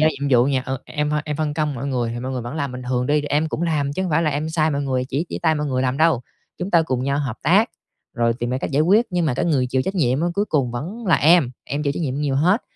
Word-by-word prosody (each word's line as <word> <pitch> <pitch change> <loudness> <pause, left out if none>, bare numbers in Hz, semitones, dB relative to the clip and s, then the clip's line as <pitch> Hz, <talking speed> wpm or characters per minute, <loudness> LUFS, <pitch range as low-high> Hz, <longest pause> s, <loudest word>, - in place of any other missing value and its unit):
giao 155 - +5
nhiệm 140 -2 -3
vụ 125 0 +5
nhè, 135 -2 +1
ừ, 130 0 -2
em 150 -1 -2
hôi 150 0 +1
em 150 -2 -3
phân 155 -2 -1
công 150 -2 -1
mọi 135 +3 -4
người 125 -4 -1
thì 120 - -5
mọi 130 +2 -4
người 125 -2 -3
vẫn 120 +4 -6
làm 140 -3 -2
bình 125 0 -7
thường 125 -1 0
đi, 150 +1 +2
em 150 +2 0
cũng 160 - -3
làm 145 -4 0
chứ 190 - -2
không 185 - -2
phải 155 +2 +2
là 155 - +1
em 150 +2 -2
sai 160 -1 +1
mọi 140 -1 -1
người, 130 -2 -1
chỉ 140 +5 -2
chỉ - - -4
tay 160 -1 +3
mọi 150 0 -2
người 130 -2 0
làm 130 0 0
đâu. 160 -4 +3 0.4
Chúng 180 +2 -4
ta 170 -3 +5
cùng 130 -5 -2
nhau 140 +1 0
hợp 125 -6 -3
tác, - - +4 0.4
rồi 115 0 +2
tìm 120 +1 -4
ra 130 - -1
cách - - -4
giải 140 +1 +2
quyết. 210 +8 +4
Nhưng 175 -2 0
mà 135 - 0
cái - - -1
người 140 -7 +2
chịu 130 +1 0
trách 190 - -3
nhiệm 135 -6 +1
á 170 - +1
cuối 205 - +1
cùng 140 - 0
vẫn 185 - -6
là 170 - +5
em, 160 -4 +4
em 145 +2 -3
chịu 140 -2 0
trách - - -5
nhiệm 135 -5 -2
nhiều 145 -1 -1
hết, 180 - +3
145 Hz, 325 wpm, -21 LUFS, 130-160 Hz, 0.4 s, giao